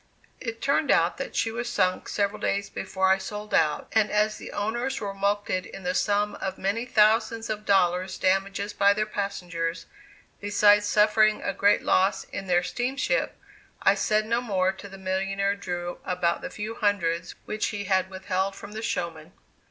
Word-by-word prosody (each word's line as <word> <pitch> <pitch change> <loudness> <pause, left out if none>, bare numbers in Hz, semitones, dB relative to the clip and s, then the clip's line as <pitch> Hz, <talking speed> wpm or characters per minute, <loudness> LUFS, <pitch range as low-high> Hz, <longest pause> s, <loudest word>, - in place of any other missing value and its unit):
It 230 -2 -6
turned 280 +2 +1
out - - +3
that - - -6
she 225 - +1
was 240 +1 -4
sunk 185 -5 0
several 200 0 -1
days 200 0 -1
before 190 0 -1
I 190 - +3
sold 210 +2 -7
out, 155 -2 +2
and 220 -1 +3
as 210 +1 +1
the - - -9
owners 240 +6 -2
were 200 -2 -4
mulcted 200 -1 0
in 195 - -10
the 180 0 -1
sum 205 +2 +1
of 190 0 -3
many 230 +5 -1
thousands 225 0 +3
of 210 0 -5
dollars 185 -1 +2
damages 195 +2 0
by 200 0 +4
their 215 0 0
passengers, 180 -5 -3 0.5
besides 205 0 +4
suffering 215 0 +3
a 195 - -1
great 200 +2 +3
loss 195 +1 +2
in 195 - -7
their 175 -1 +3
steamship, 270 - -1 0.5
I - - +6
said 215 0 +1
no 230 +2 0
more 190 -5 +1
to 195 +1 -11
the 195 - -10
millionnaire 195 +1 -1
Drew 175 -3 -5
about 180 -2 0
the - - -5
few 215 +1 -5
hundreds 175 -6 0
which 215 - -2
he 205 -2 -4
had 190 -1 +1
withheld 190 0 -2
from 200 - -10
the 215 +1 -6
showman. 170 -7 -4
200 Hz, 175 wpm, -26 LUFS, 190-215 Hz, 0.5 s, I